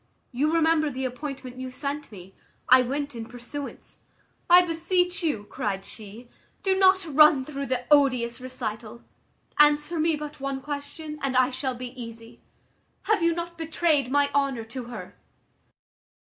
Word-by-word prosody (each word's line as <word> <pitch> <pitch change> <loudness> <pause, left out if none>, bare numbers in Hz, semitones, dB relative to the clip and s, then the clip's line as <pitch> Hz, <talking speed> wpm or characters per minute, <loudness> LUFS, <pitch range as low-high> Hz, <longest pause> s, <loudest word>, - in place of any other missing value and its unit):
You 285 +5 +1
remember 320 -2 +3
the 265 -1 -4
appointment 260 -1 -6
you 260 0 -5
sent 280 +2 -5
me; 190 -2 -12 0.3
I 255 +1 +7
went 280 +3 -3
in 225 -1 -7
pursuance." 250 +4 -8 0.5
"I 355 +1 +8
beseech 355 +2 0
you," 295 -11 -1
cried 195 -1 -4
she, 220 +3 -11 0.4
"do 385 -1 +2
not 380 0 +4
run 300 -3 +5
through 280 -1 -5
the 250 -1 -1
odious 255 -5 +3
recital. 235 -3 -6 0.6
Answer 295 +3 +4
me 320 0 +2
but 300 0 -8
one 275 0 -3
question, 295 +2 -6
and 265 -2 0
I 255 +1 +4
shall 260 0 -3
be 250 0 -6
easy. 230 0 -10 0.6
Have 430 -4 +1
you 335 0 +2
not 340 0 -6
betrayed 315 -4 +1
my 285 +1 +2
honour 275 -4 0
to 240 +2 -7
her?" 240 0 -9
275 Hz, 150 wpm, -26 LUFS, 250-310 Hz, 0.6 s, I